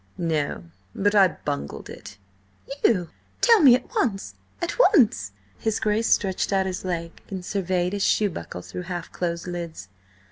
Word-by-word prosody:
"No. 160 -4 -1 0.3
But 205 +1 +1
I 200 -2 +7 0.2
bungled 70 0 -4
it." 100 - -11 0.7
"You? 180 -7 +2 0.3
Tell 465 -3 +6
me 270 -8 +8
at 250 - -3
once!–at 255 - -3 0.2
once!" 205 - +3 0.3
His 220 -1 -1
Grace 215 +1 +1
stretched 190 -1 +1
out 190 -1 +2
his 185 -1 -4
leg 170 -2 -4
and 190 -2 -6
surveyed 185 -2 -1
his 200 - -2
shoe 205 -2 +2
buckle 85 - -7
through 90 - -7
half 175 -2 -5
closed 170 -1 -3
lids. 170 - -6
185 Hz, 150 wpm, -24 LUFS, 170-205 Hz, 0.7 s, me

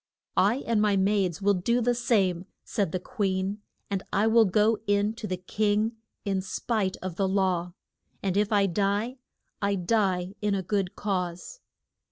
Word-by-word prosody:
I 220 +8 +3
and 230 -2 +2
my 205 -2 +3
maids 195 -2 +1
will 205 0 +4
do 235 +6 +1
the 245 +1 +2
same, 200 -7 +1 0.2
said 200 -6 -1
the 185 - -1
queen, 200 -2 -2 0.3
and 195 -2 -2
I 200 +2 +2
will 225 0 +5
go 210 +3 +3
in 205 +1 +2
to 225 -1 -6
the 185 -1 -2
king 210 +4 0 0.3
in 195 -2 0
spite 195 0 -1
of 185 -3 -5
the 195 - +2
law; 185 -3 0 0.5
and 190 -2 0
if 210 +1 +2
I 200 -2 +4
die, 205 +6 0 0.4
I 200 0 +1
die 190 -1 0
in 210 -1 +1
a 190 - -2
good 195 0 -1
cause. 185 - -3
200 Hz, 170 wpm, -27 LUFS, 185-215 Hz, 0.5 s, will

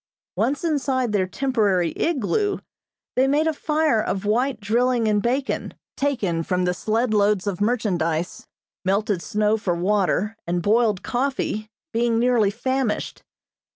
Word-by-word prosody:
Once 280 +3 0
inside 270 -6 0
their 195 -3 +1
temporary 205 -7 +1
igloo, 345 - 0 0.6
they 260 +1 +3
made 295 +3 +2
a 320 - +1
fire 305 -6 +1
of 195 -1 -3
white 240 +3 +1
drilling 235 +2 +1
and 210 -1 +2
bacon, 260 +5 -1 0.2
taken 225 -13 0
from 180 +2 0
the 180 - +1
sled 220 +5 0
loads 205 -2 +2
of 200 -2 -3
merchandise; 180 -7 -1 0.4
melted 195 -1 0
snow 210 +5 +1
for 185 -5 -1
water, 200 +3 +1
and 175 0 -1
boiled 215 -2 +2
coffee, 245 -4 -2 0.2
being 230 0 +1
nearly 235 -3 +3
famished. 255 +1 -2
220 Hz, 135 wpm, -23 LUFS, 200-260 Hz, 0.6 s, they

